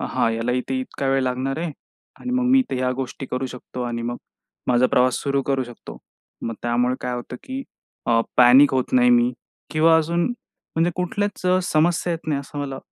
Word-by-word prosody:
हा - - 0
ह्याला 115 +2 -1
इथे 125 +1 -1
इतका 130 +1 -4
वेळ 135 0 +2
लागणार 130 +3 -1
आहे 170 -1 -2 0.5
आणि 250 - -4
मग 255 - +1
मी 265 - +6
इथे 245 - 0
ह्या 130 0 0
गोष्टी 135 +1 -5
करू 130 +1 -2
शकतो 125 0 -7
आणि 120 -1 -3
मग 120 +1 -3 0.5
माझा 125 0 +4
प्रवास 125 0 +3
सुरू 140 0 0
करू 135 -1 0
शकतो. 120 -1 -11 0.5
मग 115 - -3
त्यामुळे 120 +1 +1
काय 125 -1 -3
होतं 125 +1 -6
की 265 +1 -5 0.4
अ, 115 -1 +4 0.2
पॅनिक 130 +3 +7
होत 130 - -1
नाही 125 -1 +5
मी 120 +1 +4 0.4
किंवा 160 +1 +5
अजून, 170 +2 +1 0.5
म्हणजे 165 +2 +3
कुठल्याच 200 +3 -2 0.2
समस्या 170 +2 +1
येत 165 - -6
नाही 145 -3 +1
असं 145 +1 -9
मला 135 -2 -4
130 Hz, 190 wpm, -22 LUFS, 125-160 Hz, 0.5 s, पॅनिक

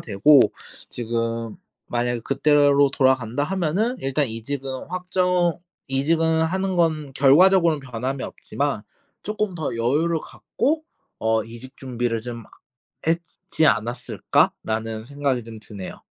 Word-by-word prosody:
되고 125 +7 +5 0.5
지금 115 0 -3 0.3
만약에 120 0 -1
그때로 145 +1 +3
돌아간다 130 -1 +1
하면은 190 +8 0
일단 135 +2 0
이직은 130 +3 -5
확정 180 -1 0 0.3
이직은 160 +4 +2
하는 190 +3 0
건 155 -5 +1
결과적으로는 165 +3 +5
변함이 130 +1 -4
없지만 140 -7 -3 0.4
'쪼끔 210 -2 -2
더 155 -7 -3
여유를 150 +8 +1
갖고 310 +4 -2 0.4
어 110 0 +1
이직 120 +4 -10
준비를 120 -3 -2
좀 115 -1 -7
하 - - -20 0.6
했지 165 +1 -1
지 160 - +3
않았을까?'라는 110 -1 0
생각이 140 -2 -1
좀 110 -1 -10
드네요. 100 -3 -8
135 Hz, 275 characters per minute, -23 LUFS, 115-165 Hz, 0.6 s, 되고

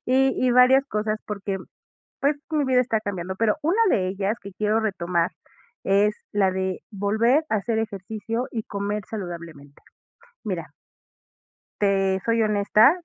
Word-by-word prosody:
y 265 +1 +4 0.2
y - - +4
varias 250 +2 +6
cosas 215 0 -1
porque, 200 -2 -3 0.6
pues, 285 +1 +2
mi 300 -3 +1
vida 255 -1 +3
está 225 -3 0
cambiando, 190 -3 -4
pero 225 +4 +2
una 345 +8 +1
de 185 -1 +2
ellas, 195 +3 -1
que 200 0 -9
quiero 215 +2 +1
retomar, 175 -5 0 0.5
es 205 +2 +3 0.2
la 195 -2 +3
de 190 0 -2
volver 220 +9 +2
a 220 - +1
hacer 220 +2 -1
ejercicio 220 +2 -3
y 225 -2 -4
comer 200 0 -3
saludablemente. 170 -8 -8 0.6
Mira - - -4 1.1
te 195 -1 +2
soy 230 0 +2
honesta, 210 +3 +5
210 Hz, 145 wpm, -24 LUFS, 195-230 Hz, 1.1 s, varias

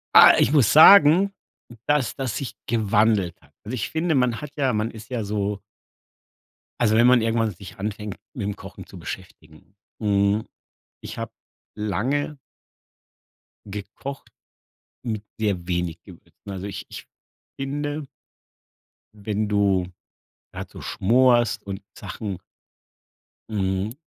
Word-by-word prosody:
Ah, - - +10
ich 120 - +4
muss 140 -8 +4
sagen, 180 +3 +8 0.6
dass 145 -4 +1
das 130 -6 -2
sich 115 -5 -4
gewandelt 105 -4 +2
hat. - - -25
Also 110 +4 -6
ich 110 - -3
finde, 160 +1 0
man 125 -4 +1
hat 150 -1 -7
ja 135 -4 +1
man 110 +2 -1
ist 110 0 -12
ja 120 -4 -2
so 100 -1 -2 1.2
also 110 -2 +4
wenn 120 +2 +5
man 125 -2 +6
irgendwann 115 -1 +1
sich 100 +3 -12
anfängt, 105 0 -4 0.2
mitm 105 -6 -3
Kochen - - -11
zu - - -12
beschäftigen, 85 0 -10 0.3
hm, 100 +1 +2 0.5
ich - - -8
habe - - -5 0.4
lange 130 +8 -1 1.3
gekocht 105 +7 -7 0.7
mit 110 -4 -3 0.2
sehr 95 -5 -1
wenig 90 -2 -2
Gewürzen. - - -14
Also 95 0 -5
ich 100 - -6
ich - - -9 0.5
finde 145 +2 -3 1.1
wenn 105 0 -2
du 100 -3 +2 0.6
grad - - -7
so - - -11
schmorst 120 +3 +3
und 100 0 -6 0.2
Sachen 100 -1 -5 1.1
hm, 100 +2 -1
110 Hz, 125 wpm, -24 LUFS, 100-125 Hz, 1.3 s, Ah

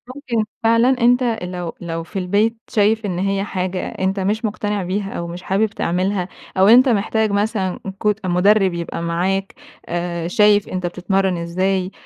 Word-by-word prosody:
ممكن 245 -6 -1 0.2
فعلًا 230 +2 +4
أنت 245 +2 +4
أ 225 -6 -1
لو 180 -2 -5
لو 165 -1 -4
في 195 +4 -5
البيت 205 +5 +1
شايف 215 +1 +2
إن 180 -3 -2
هي 195 +1 0
حاجة 185 -2 -3
أنت 190 +1 -2
مش 210 +4 -1
مُقتنع 205 -1 -2
بيها 195 +2 -3
أو 170 - -4
مش 175 +2 -8
حابب 195 +3 +1
تعملها 185 -1 -1 0.3
أو 190 +1 +5
أنت 250 +4 +7
محتاج 220 -1 +1
مثلًا 200 -2 -1 0.2
كوت 210 -1 0
مُدرّب 190 +1 +3
يبقى 170 -1 -4
معاك، 185 +4 -1 0.3
آآ 170 -1 -3
شايف 210 +1 +4
أنت 185 -1 -3
بتتمرّن 185 +1 0
إزاي 185 +2 -1
195 Hz, 165 wpm, -20 LUFS, 180-210 Hz, 0.3 s, أنت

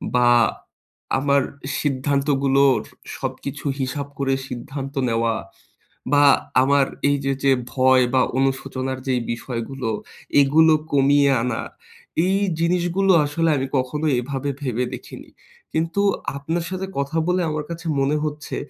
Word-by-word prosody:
বা 125 -1 +5 0.9
আমার 140 0 +3 0.4
সিদ্ধান্ত 140 0 0 0.2
গুলোর, 135 -1 +4 0.4
সবকিছু 140 +1 -5
হিসাব 135 +2 -3
করে 135 -1 0
সিদ্ধান্ত 135 +2 -6 0.2
নেওয়া 115 0 +1 0.8
বা 145 0 +6 0.4
আমার 140 0 +3 0.2
এই 145 - +2
যে 135 - +1
যে 135 - +4 0.2
ভয় 130 -1 +4
বা 130 - +4 0.2
অনুশোচনার 130 -1 -1
যেই 125 -2 +1
বিষয়গুলো, 115 +1 -5 0.5
এগুলো 155 +3 +5 0.2
কমিয়ে 140 0 +4
আনা। 125 -1 -2 0.6
এই 190 +1 +2 0.2
জিনিস 170 +1 +1
গুলো 195 -1 +4
আসলে 165 +3 0
আগে 135 -1 -1
কখনো 130 +4 -2
এভাবে 135 +2 -3
ভেবে 125 -2 -1
দেখিনি। - - -9 0.4
কিন্তু 165 +5 0 0.4
আপনার 165 +4 -2
সাথে 190 +1 -4
কথা 140 +3 -1
বলে, 180 +1 +2
আমার 150 0 -2
কাছে 170 0 -7
মনে 140 +2 +1
হচ্ছে, 150 0 -4
140 Hz, 130 wpm, -22 LUFS, 130-150 Hz, 0.9 s, বা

